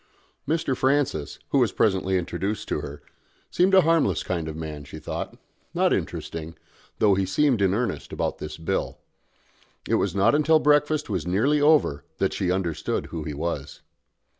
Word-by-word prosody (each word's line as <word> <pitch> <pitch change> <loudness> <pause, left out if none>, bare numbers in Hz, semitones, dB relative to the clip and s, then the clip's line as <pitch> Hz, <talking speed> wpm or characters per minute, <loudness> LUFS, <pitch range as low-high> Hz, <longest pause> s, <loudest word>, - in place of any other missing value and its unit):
Mr. 155 -3 0
Francis, 130 - 0
who - - +3
was - - +3
presently 95 -2 +1
introduced 95 +4 -3
to - - -1
her, 70 0 -8 0.5
seemed 190 +2 +3
a 190 - +8
harmless 160 - +2
kind 85 -3 -3
of 80 - -5
man, 80 -2 -6
she 70 +2 -10
thought, 75 - -5 0.4
not - - +3
interesting, 80 0 -4 0.4
though 105 -2 +4
he 95 0 +1
seemed 120 +5 +2
in 95 -2 +3
earnest 115 -3 -2
about - - -2
this 75 - -6
Bill. 80 - -2 0.9
It - - -1
was - - -1
not 100 +4 +4
until 155 +2 +4
breakfast 150 0 +2
was 90 -5 -3
nearly 130 +12 +2
over 145 - +3
that 95 - 0
she 95 -3 -1
understood 90 -4 -1
who 80 -3 -5
he 75 -2 -4
was. 75 -2 -4
95 Hz, 165 wpm, -25 LUFS, -, 0.9 s, a